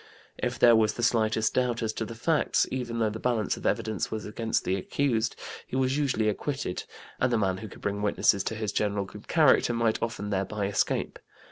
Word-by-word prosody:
If - - -2
there 120 -1 +7
was 110 -1 +2
the 120 - -4
slightest 110 -2 +2
doubt 125 -2 0
as 110 -1 -1
to 110 - -3
the 115 - -8
facts, 155 +7 +2
even 125 -3 -3
though 110 -2 +1
the 110 - -6
balance 115 -5 0
of - - -3
evidence 110 -3 -1
was 110 -1 -4
against 110 +2 -1
the 95 - 0
accused, 115 +3 0 0.3
he - - -6
was 130 0 +1
usually 130 -7 +1
acquitted, 130 -1 -2 0.3
and 130 - +2
the 120 - +3
man 95 -3 +1
who 110 - -7
could - - -13
bring 100 0 -2
witnesses 100 -1 +2
to 110 - -2
his 110 -1 -2
general 100 -1 0
good 105 +2 -12
character 150 -6 +4
might 115 -1 +1
often 105 -3 -3
thereby 100 +1 -1
escape. 100 0 -1
110 Hz, 210 wpm, -28 LUFS, 105-120 Hz, 0.3 s, there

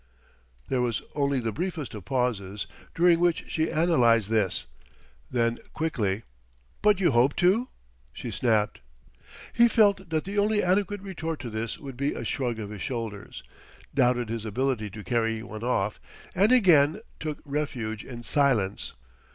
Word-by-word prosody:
There 130 -2 0
was 120 -3 -1
only 140 -2 +1
the 115 -2 -2
briefest 165 - -4
of 105 -5 -8
pauses, 105 -5 -1 0.3
during 170 0 +5
which 175 -1 +1
she 160 0 0
analyzed 120 - +3
this; 105 -4 +1 0.6
then, 115 -1 +1
quickly, 115 -10 -1 0.6
"But 210 -2 +4
you 175 -5 +3
hope 125 +3 +3
to?" 195 +8 +3 0.4
she 120 - -6
snapped. 110 -2 +1 0.7
He 235 0 +6
felt 200 -5 +3
that 155 -1 0
the 200 +2 -2
only 210 +1 +2
adequate 200 +2 +1
retort 165 -5 -4
to 120 -2 -6
this 110 +1 -3
would 135 -4 -9
be 140 +2 -1
a - - -5
shrug 120 -4 -1
of 105 -2 -6
his 105 - -7
shoulders; 115 -6 -5 0.5
doubted 125 -4 +2
his 115 -1 -3
ability 115 0 -1
to 105 +1 -9
carry 115 -2 0
one 110 -1 -8
off; 110 -4 0 0.3
and 200 +5 +4
again 180 - +5 0.2
took 155 -2 -3
refuge 130 -7 -3
in 120 -2 -9
silence. 120 -9 +1
130 Hz, 150 wpm, -27 LUFS, 115-165 Hz, 0.7 s, He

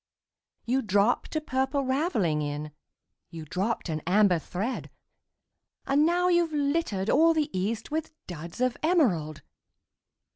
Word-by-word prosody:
You 255 +3 +1
dropped 210 +6 +1
a - - +2
Purple 265 0 -1
Ravelling 260 - 0
in 150 +1 -4 0.6
You 160 -2 -8
dropped 195 +9 -2
an 155 -2 -3
Amber 190 -2 +4
thread 200 - -4 1.0
And 285 +3 +3
now 355 +1 +2
you've 345 -2 +2
littered 285 - -1
all 330 +1 +5
the 300 -7 -1
east 215 +7 -2
With 315 +1 -2
Duds 170 +4 -8
of 255 -1 +1
Emerald! 205 - +1
240 Hz, 130 wpm, -27 LUFS, 180-300 Hz, 1.0 s, all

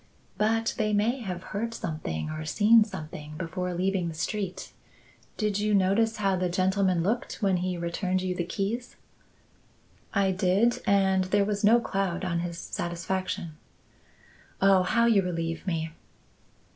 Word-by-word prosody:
"But 225 +1 +1
they 215 -1 +1
may 225 +6 +2
have 185 -5 -5
heard 230 +3 -2
something 155 - -4
or 155 0 -5
seen 215 +8 +5
something 155 -6 -8
before 180 +1 -3
leaving 185 0 0
the 165 - -5
street. 190 +2 -4 0.6
Did 210 -2 0
you 210 0 +2
notice 200 +4 +2
how 195 -2 +1
the 180 0 0
gentleman 185 -1 +1
looked 220 +3 -2
when 195 -2 +3
he 180 0 -2
returned 180 +2 -1
you 185 -1 -1
the 180 - -2
keys?" 200 +7 -3 1.2
"I 195 -1 +2
did, 190 +5 +2
and 190 -1 +3
there 200 +2 +2
was 205 0 -2
no 225 +3 +6
cloud 195 -4 -2
on 170 -2 0
his 170 0 -4
satisfaction." 175 0 -3 1.0
"Oh, 195 -1 +5
how 235 +6 +2
you 225 -4 +5
relieve 165 -1 -3
me!" 160 -2 -1
190 Hz, 145 wpm, -27 LUFS, 175-205 Hz, 1.2 s, no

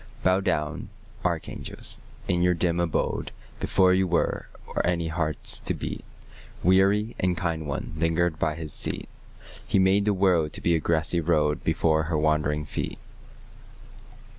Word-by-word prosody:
Bow 95 +1 +4
down, 80 -4 -2 0.3
archangels, - - -4 0.3
in 85 - +1
your 90 0 +3
dim 85 0 0
abode: 85 -2 -1 0.3
Before 95 -1 +3
you 95 0 +2
were, 85 -1 0 0.2
or - - -2
any 85 -2 0
hearts 80 -2 +1
to - - -1
beat, - - -5 0.6
Weary 100 +5 +3
and 90 -1 +1
kind 80 -3 -2
one 70 - -4
lingered 80 0 +1
by 75 -2 0
His 80 -2 -4
seat; - - +1 0.6
He - - +2
made 95 +2 +4
the 105 - +3
world 90 -5 +2
to - - -4
be 85 - +2
a 80 - +3
grassy 85 +1 +1
road 75 -2 +1
Before 80 -1 +2
her 80 0 -1
wandering 75 -1 +1
feet. - - -4
85 Hz, 150 wpm, -26 LUFS, 80-90 Hz, 0.6 s, Bow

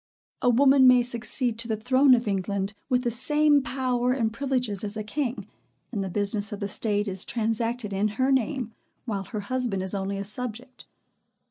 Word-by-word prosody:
A 245 - +3
woman 265 +2 +5
may 250 -1 +6
succeed 240 0 +2
to 230 - -1
the 220 -2 -1
throne 255 +4 +4
of 235 -2 -3
England 195 0 -2 0.2
with 250 -1 +1
the 240 - 0
same 295 +4 +4
power 250 -1 -1
and 225 -4 -1
privileges 250 -6 -2
as 210 +1 -3
a 215 - -3
king; 250 +3 -3 0.5
and 205 -5 -2
the 190 - -4
business 205 +2 -2
of 205 - -5
the 200 - -3
state 205 +1 -1
is 190 -1 -3
transacted 230 -1 -2
in 200 +2 +1
her 260 +1 +2
name, 255 -2 -1 0.3
while 200 -5 -3
her 215 +1 -5
husband 235 -3 -2
is 190 - -4
only 195 0 -3
a 200 - -3
subject. 245 +4 -6
230 Hz, 190 wpm, -26 LUFS, 205-255 Hz, 0.5 s, may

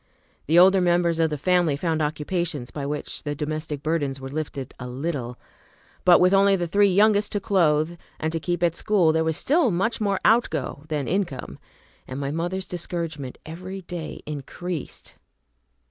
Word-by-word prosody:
The 160 +4 +4
older 190 +2 +7
members 175 -1 +2
of 165 -1 +3
the 150 - -3
family 175 -1 +2
found 160 +1 -1
occupations 155 -2 -2
by 140 -2 -4
which 150 +1 -4
the 145 -1 -3
domestic 150 -1 -4
burdens 145 -4 -1
were 135 0 -7
lifted 145 -3 -5
a 125 - -6
little; 125 -2 -4 0.7
but, 180 -1 +7
with 180 +1 +4
only 195 0 +5
the 175 -2 -1
three 200 +4 +3
youngest 205 +2 +3
to 205 - +1
clothe 170 -5 +2 0.2
and 160 - -1
to 165 - -2
keep 175 +1 -2
at 170 -1 +2
school, 190 -7 +3
there 160 0 +2
was 160 -1 0
still 305 -2 +3
much 220 +6 0
more 200 -2 +1
outgo 220 -9 +1
than 150 -5 -2
income, 155 - -2 0.5
and 130 +1 -5
my 140 0 -2
mother's 175 +4 -3
discouragement 165 -6 -5
every 185 +4 -7
day 175 -2 -7
increased. 150 +3 -6
165 Hz, 170 wpm, -24 LUFS, 150-185 Hz, 0.7 s, older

